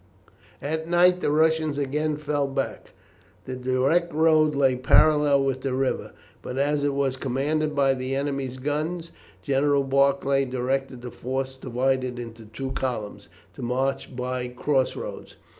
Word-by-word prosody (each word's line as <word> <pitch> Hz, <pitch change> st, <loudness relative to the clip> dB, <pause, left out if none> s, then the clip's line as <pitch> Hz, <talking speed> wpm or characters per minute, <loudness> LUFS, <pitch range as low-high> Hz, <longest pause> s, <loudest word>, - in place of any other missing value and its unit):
At 160 Hz, +2 st, -2 dB
night 180 Hz, +1 st, +5 dB
the -, -, +1 dB
Russians 155 Hz, -1 st, +2 dB
again 150 Hz, +2 st, -1 dB
fell 145 Hz, -1 st, -1 dB
back. 135 Hz, 0 st, -4 dB, 0.5 s
The 130 Hz, -, -5 dB
direct 130 Hz, +7 st, +1 dB
road 155 Hz, -1 st, +3 dB
lay 135 Hz, -2 st, +3 dB
parallel 145 Hz, +2 st, +4 dB
with 135 Hz, -1 st, -1 dB
the 130 Hz, -1 st, -1 dB
river, 135 Hz, 0 st, -1 dB, 0.3 s
but 125 Hz, -, -6 dB
as 145 Hz, +1 st, +1 dB
it 145 Hz, -1 st, 0 dB
was 135 Hz, -2 st, 0 dB
commanded 150 Hz, +4 st, -1 dB
by 135 Hz, -1 st, +3 dB
the 130 Hz, +1 st, -3 dB
enemy's 135 Hz, -2 st, -2 dB
guns 155 Hz, +5 st, -3 dB, 0.3 s
General 140 Hz, 0 st, +2 dB
Barclay 140 Hz, 0 st, +2 dB
directed 130 Hz, 0 st, -2 dB
the 125 Hz, -, -6 dB
force, 130 Hz, +1 st, -3 dB
divided 130 Hz, 0 st, -1 dB
into 115 Hz, -2 st, -8 dB
two 120 Hz, +5 st, -6 dB
columns, 120 Hz, -6 st, -4 dB, 0.2 s
to -, -, -10 dB
march 130 Hz, +2 st, -2 dB
by 125 Hz, 0 st, -3 dB
cross 130 Hz, +2 st, 0 dB
roads. -, -, -7 dB
135 Hz, 145 wpm, -25 LUFS, 130-150 Hz, 0.5 s, night